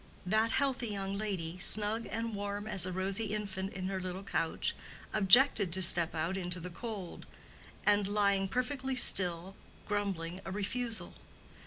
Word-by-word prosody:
That 220 +4 0
healthy 270 -3 -1
young 195 -2 -5
lady, 185 -5 -5
snug 215 +4 +5
and 230 0 -5
warm 205 0 -6
as 190 -4 +3
a - - -6
rosy 190 +4 -1
infant 200 -2 -6
in 185 -1 -6
her 190 -1 -5
little 185 +1 -7
couch, 165 -4 -3 0.4
objected 215 -1 +5
to 190 - -2
step 170 -1 +3
out 165 +4 -3
into 180 -1 -4
the 180 +1 -9
cold, 200 -1 -9 0.6
and 205 -1 +1
lying 200 -1 -1
perfectly 260 +4 -4
still, 185 -5 +6 0.3
grumbling 190 -4 -5
a - - -9
refusal. 220 +4 -2
200 Hz, 150 wpm, -30 LUFS, 185-215 Hz, 0.6 s, still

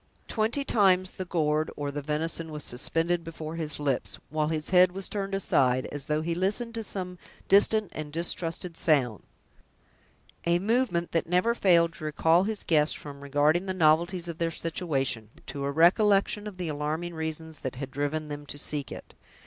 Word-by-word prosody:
Twenty 230 +6 0
times 185 -5 +3
the 185 - -6
gourd 155 -3 0
or 145 -1 -3
the 145 +1 -4
venison 160 +2 -1
was 150 -1 -5
suspended 165 +7 -1
before 160 -1 -7
his 155 -3 -2
lips, 125 -8 -1
while 155 0 0
his 155 0 -2
head 180 -1 +6
was 195 0 -4
turned 195 -1 -3
aside, 130 -9 +2
as 145 -2 -3
though 150 +1 0
he 170 +1 -1
listened 205 +7 -1
to 225 -1 -3
some 180 -3 -5 0.3
distant 205 +1 +4
and 155 -1 -6
distrusted 170 +1 -1
sounds—a 150 - -3
movement 200 -3 0
that 165 0 -1
never 180 +7 +3
failed 170 -6 +4
to 155 - -8
recall 165 +4 +3
his 215 -1 -3
guests 150 -2 +3
from 140 -1 -9
regarding 145 +6 +2
the 185 - -2
novelties 170 +2 +2
of 170 -1 -6
their 165 0 +1
situation, 140 - -2 0.2
to 140 -1 -4
a 140 - -1
recollection 200 +6 +3
of 200 -3 -8
the 180 -2 -3
alarming 155 +3 -3
reasons 160 -1 -5
that 130 - -5
had 135 +1 -6
driven 145 +2 -2
them 145 0 -7
to 145 - -6
seek 145 -1 -4
it. - - -9
165 Hz, 175 wpm, -28 LUFS, 150-185 Hz, 0.3 s, head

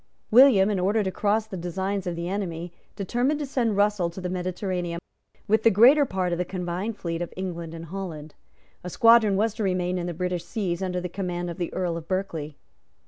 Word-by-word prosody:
William, 220 -5 +7
in 200 - 0
order 205 +4 +2
to 190 - -2
cross 210 +3 +1
the 215 -3 -8
designs 190 +2 -3
of 175 - -2
the 170 +1 -4
enemy, 175 -3 -4 0.2
determined 245 +9 0
to 295 - -2
send 235 -6 0
Russell 205 -4 +2
to 170 - -9
the 180 -1 -4
Mediterranean 180 -1 -3 0.5
with 220 +1 +3
the 230 - +6
greater 250 +8 +6
part 185 -6 -2
of 175 - -1
the - - +2
combined 185 +4 -4
fleet 170 -3 -4
of 175 - -4
England 170 -3 -5
and 165 0 -8
Holland. 165 -4 -7 0.5
A 180 - -5
squadron 230 0 +5
was 220 +1 +1
to 220 - -4
remain 180 -1 0
in 175 - -3
the 175 - -4
British 180 0 -2
seas 175 -1 -2
under 180 -1 -1
the 180 - -3
command 175 -1 -4
of 170 - -9
the 175 - -2
Earl 175 -3 -2
of 165 -1 -9
Berkeley. 165 -6 -3
185 Hz, 210 wpm, -25 LUFS, 175-205 Hz, 0.5 s, William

